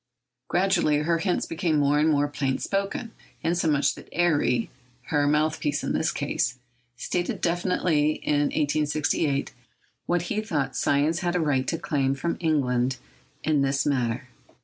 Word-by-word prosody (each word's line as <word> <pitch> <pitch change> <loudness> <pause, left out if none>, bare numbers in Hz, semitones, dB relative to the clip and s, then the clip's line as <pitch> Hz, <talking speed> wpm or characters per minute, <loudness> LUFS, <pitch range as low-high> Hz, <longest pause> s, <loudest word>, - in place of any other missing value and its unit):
Gradually, 175 -5 +2
her 165 +3 +1
hints 180 +1 0
became 165 -2 0
more 145 0 +3
and 155 +1 +3
more 145 -1 +2
plain 135 -2 -1
spoken; 200 +4 -2 0.3
insomuch 155 -4 +2
that - - -13
Airy—her 130 -3 0
mouthpiece 150 0 +1
in - - -1
this 160 - +1
case—stated 125 +3 -3
definitely 170 -3 +1
in 145 -1 0
1868 150 -1 0 0.5
what 175 -1 +1
he 210 +4 -2
thought 155 -11 -2
science 150 +4 +2
had 175 -2 -1
a - - +2
right 140 -5 +1
to 165 - 0
claim 135 -4 0
from 170 +5 -2
England 130 -6 +1 0.5
in 155 -3 +2
this 135 0 +1
matter. 125 -2 0
150 Hz, 135 wpm, -26 LUFS, 135-170 Hz, 0.5 s, more